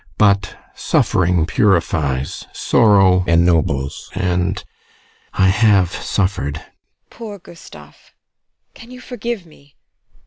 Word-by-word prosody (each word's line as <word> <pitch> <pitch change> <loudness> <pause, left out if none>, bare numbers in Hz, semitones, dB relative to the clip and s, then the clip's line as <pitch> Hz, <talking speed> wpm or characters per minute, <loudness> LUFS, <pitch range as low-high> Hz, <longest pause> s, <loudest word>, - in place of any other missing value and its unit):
But 100 -3 +2 0.2
suffering 90 -2 +1
purifies, 80 - 0
sorrow 95 -5 +3
ennobles, 80 -5 +1
and 90 +2 -1 0.7
I 95 -1 +3
have 100 -3 +3
suffered! 95 -10 -2
TEKLA. - - -10 0.5
Poor 220 -3 -9
Gustav! 175 -2 -16 0.6
Can 230 - -14
you 250 0 -11
forgive 235 -5 -6
me? 145 -3 -22
95 Hz, 95 wpm, -18 LUFS, 85-130 Hz, 0.7 s, sorrow